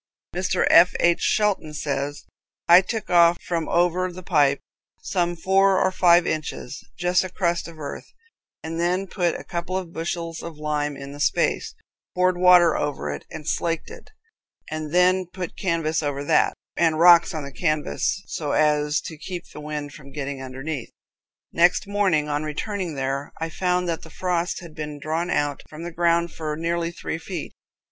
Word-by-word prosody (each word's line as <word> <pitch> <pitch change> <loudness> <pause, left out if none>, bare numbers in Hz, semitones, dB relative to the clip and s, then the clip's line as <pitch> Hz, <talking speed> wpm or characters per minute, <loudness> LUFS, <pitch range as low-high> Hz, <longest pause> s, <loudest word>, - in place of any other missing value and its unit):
Mr. 185 0 +1
F. 175 +2 +7
H. 170 0 +3
Shelton 200 -8 +1
says: 145 0 -3 0.4
"I 175 +2 +9
took 215 +2 -5
off 170 -1 +5
from 165 -3 -3
over 180 +1 +2
the 185 +1 -10
pipe, 145 -6 +3 0.4
some 175 -2 0
four 190 +3 +3
or 190 - +2
five 175 -2 +5
inches, 150 -4 -4
just 180 +1 +2
a 185 - -5
crust 175 -2 -1
of 165 -1 -12
earth, 145 -2 -7 0.5
and 165 +1 -4
then 180 +3 +1
put 175 -3 -1
a - - -9
couple 175 +1 -3
of 175 -3 -6
bushels 165 0 -4
of 170 -2 -8
lime 150 -1 -2
in 140 0 -8
the 145 - -10
space, - - 0 0.4
poured 185 0 +3
water 180 -1 +6
over 135 - -2
it, 70 - -7
and 150 - -9
slaked 165 - -1
it, 465 0 -12 0.6
and 155 -1 -4
then 180 +1 +3
put 180 -1 -6
canvas 165 -4 0
over 145 -2 -2
that, - - +3 0.2
and 165 -2 +2
rocks 170 0 +7
on 155 - -3
the 140 - -7
canvas, 155 +4 -1
so 150 -3 -3
as 150 0 +2
to 155 - -8
keep 175 +2 -7
the 150 - -9
wind 150 -1 -5
from 140 -2 -13
getting 140 -1 -5
underneath. 130 0 -5 0.6
Next 175 +3 +3
morning, 195 -7 +1
on 145 0 -1
returning 170 +3 -3
there, 135 +1 -3
I 165 0 -2
found 180 +1 0
that 165 -1 -2
the 165 - -12
frost 175 +1 -2
had 170 -3 -11
been 150 -1 -6
drawn 160 +4 -2
out 145 -3 0
from 155 +2 -9
the 175 - -5
ground 170 0 +2
for 155 -1 -4
nearly 170 +1 -1
three 165 -1 -5
feet. 165 -1 -6
165 Hz, 175 wpm, -24 LUFS, 150-180 Hz, 0.6 s, I